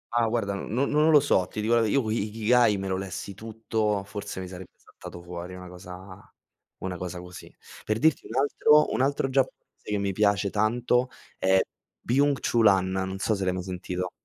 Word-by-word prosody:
Ah, 115 -1 +3
guarda, 110 -3 -1
no 120 +7 -1
non 150 +2 +3
lo 150 -2 +8
so, 95 -10 +2
ti 110 - -7
dico 110 +2 +1
la 115 - +5
v 110 - +2
io 130 -3 +1
i 110 -2 0
Ikigai 110 0 +3
me 95 0 -4
lo 95 0 -1
lessi 95 +1 -6
tutto, 110 -1 -2
forse 100 -1 -6
mi 90 - -6
sarebbe 90 0 -9
saltato 85 - -12
fuori 90 +1 -7
una 90 0 -9
cosa 90 +2 -11 0.5
una 90 -1 -3
cosa 90 0 -5
così. 90 0 -11 0.3
Per 110 0 -1
dirti 160 +5 +2
un 115 - -8
altro 150 +2 +4
un - - 0
altro 135 0 +1
giapponese 130 -4 -2
che 105 - 0
mi 100 -1 -1
piace 100 -1 +2
tanto 120 +4 +1 0.3
è 95 0 +4 0.4
Byung 140 +3 +2
Chul 115 -2 +3
Han, 95 -1 +3
non 95 0 -2
so 110 +3 0
se 100 -1 -2
l'hai 90 -1 +1
mai 90 -1 -4
sentito. 90 0 -4
100 Hz, 200 wpm, -26 LUFS, 95-120 Hz, 0.5 s, lo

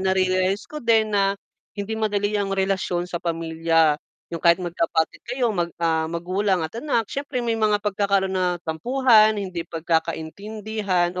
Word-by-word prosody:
narealize 190 +2 +1
ko 300 0 -8
din 220 -2 +2
na 195 -1 +2 0.4
hindi 200 +2 -4
madali 205 -1 0
ang 200 -1 -1
relasyon 190 -2 0
sa 175 -1 -5
pamilya. 165 -2 +1 0.4
Yung 165 - -4
kahit 170 -1 +5
magkapatid 165 -2 -1
kayo 245 -2 0
mag, 175 -3 -1
ah, 160 -1 0
magulang 180 +2 0
at 160 - -5
anak 235 -7 0
siyempre 275 -3 -3
may 230 - +1
mga 210 -2 +2
pagkakaroon 200 -1 +1
na 180 -1 +1
tampuhan, 220 +5 +4
hindi 185 -4 -4
pagkakaintindihan 175 +4 -2
190 Hz, 145 wpm, -23 LUFS, 170-215 Hz, 0.4 s, kahit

